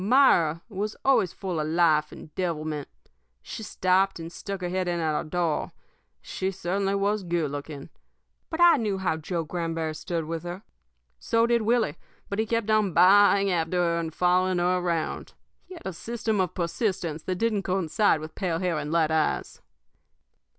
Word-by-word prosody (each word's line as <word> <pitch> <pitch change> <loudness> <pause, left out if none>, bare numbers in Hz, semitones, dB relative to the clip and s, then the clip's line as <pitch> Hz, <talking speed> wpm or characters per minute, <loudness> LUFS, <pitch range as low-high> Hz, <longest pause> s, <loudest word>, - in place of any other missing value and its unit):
Myra 180 - +4
was 210 0 -4
always 260 -10 +3
full 185 -5 -4
of 155 - -1
life 155 -2 +3
and 155 - -12
devilment. 155 -5 -3 0.6
She - - -7
stopped 190 -2 +1
and 165 0 -7
stuck 195 +1 -6
her 180 - -2
head 185 0 -1
in 175 -1 -1
our 155 -2 0
door. 165 0 -1 0.5
She 190 - -3
certainly 195 +1 -1
was 200 +1 0
good 170 -5 -1
looking. 145 0 -7 0.6
But 325 +1 -3
I 345 -3 +7
knew 210 -5 -1
how 185 -4 -1
Joe 165 +2 -3
Granberry 165 -1 -3
stood 165 +1 -3
with 165 +1 -4
her. 175 +4 -7 0.6
So 230 0 +2
did 235 0 +2
Willie; 225 -7 +1 0.3
but 200 - -3
he 220 - 0
kept 230 -1 0
on 215 -4 +2
ba - - +4
a 200 +2 +7
a - - +1
ing 200 -1 +1
after 170 0 0
her 170 -1 +1
and 165 -1 -3
following 180 +2 +2
her 180 +1 +2
around. 170 -3 -2 0.3
He 370 - -11
had 335 - -13
a 190 - -3
system 220 +2 -2
of 180 - -2
persistence 170 -2 -2
that 185 - -3
didn't 215 +1 0
coincide 185 -2 +1
with 155 0 -8
pale 180 -5 -2
hair 175 -3 -1
and 150 0 -4
light 160 -2 +2
eyes. 160 -1 -1
180 Hz, 185 wpm, -26 LUFS, 165-200 Hz, 0.6 s, I